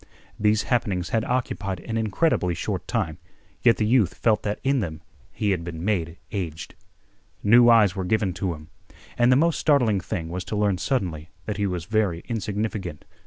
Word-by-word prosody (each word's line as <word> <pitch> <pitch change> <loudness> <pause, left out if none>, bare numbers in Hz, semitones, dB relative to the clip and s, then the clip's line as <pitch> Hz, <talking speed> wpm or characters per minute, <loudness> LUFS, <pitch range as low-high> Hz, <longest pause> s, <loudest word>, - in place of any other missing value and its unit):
These 105 +1 +3
happenings 100 -8 0
had 110 -1 +1
occupied 100 -7 -2
an 115 - -5
incredibly 110 - +1
short - - -3
time, 80 +1 -2 0.4
yet 115 -1 +5
the 110 - +1
youth 110 -5 +3
felt 110 -3 +2
that 105 0 -3
in 135 0 +2
them 80 -6 -4 0.3
he 105 -2 -1
had 90 -3 -1
been 85 0 -6
made 85 -5 -1
aged. 85 -7 -5 0.7
New 120 +3 +7
eyes 105 -5 +5
were 95 - -2
given 95 0 0
to 95 -1 -2
him. 75 +1 -14 0.5
And 120 +1 +4
the - - +6
most 165 +4 +2
startling 125 -10 +3
thing 85 -3 -4
was 90 +2 -4
to 100 - -4
learn 100 -3 +1
suddenly 85 - -2 0.2
that 105 -1 -3
he 100 -1 0
was 90 -3 -3
very 105 -5 0
insignificant. 105 -6 -3
105 Hz, 180 wpm, -24 LUFS, 90-115 Hz, 0.7 s, New